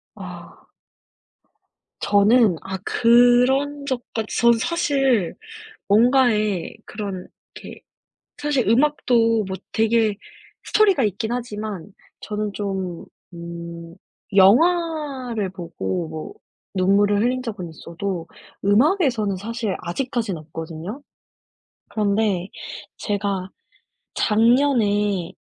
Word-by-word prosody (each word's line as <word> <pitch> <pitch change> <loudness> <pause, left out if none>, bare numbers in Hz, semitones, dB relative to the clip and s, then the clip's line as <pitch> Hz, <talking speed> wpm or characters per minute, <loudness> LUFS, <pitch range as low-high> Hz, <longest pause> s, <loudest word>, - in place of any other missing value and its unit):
아. - - -11 1.4
저는 205 -2 +4
아 190 0 -5
그런 250 +6 +3
적까지 240 -4 -3
전 235 0 +6
사실 270 - +1 0.5
뭔가에 215 -4 +3
그런 200 -4 -6 0.3
이렇게 - - -10 0.6
사실 290 -6 0
음악도 230 -4 +3
뭐 190 0 -4 0.2
되게 220 -1 +2 0.5
스토리가 400 -9 +3
있긴 220 +3 -2
하지만 210 -6 -5 0.3
저는 210 -1 -3
좀 190 -4 -4 0.3
음 170 0 -8 0.4
영화를 265 - +3
보고 175 -1 -4
뭐 160 - -7 0.4
눈물을 200 +2 +3
흘린 250 +2 0
적은 195 -8 -5
있어도 170 +2 -5 0.4
음악에서는 230 - +2
사실 220 +1 -3
아직까진 225 +1 -2
없거든요. 165 - -7 0.9
그런데 205 -3 0 0.5
제가 200 -3 -2 0.7
작년에 210 -6 +2
210 Hz, 190 characters per minute, -22 LUFS, 190-245 Hz, 1.4 s, 전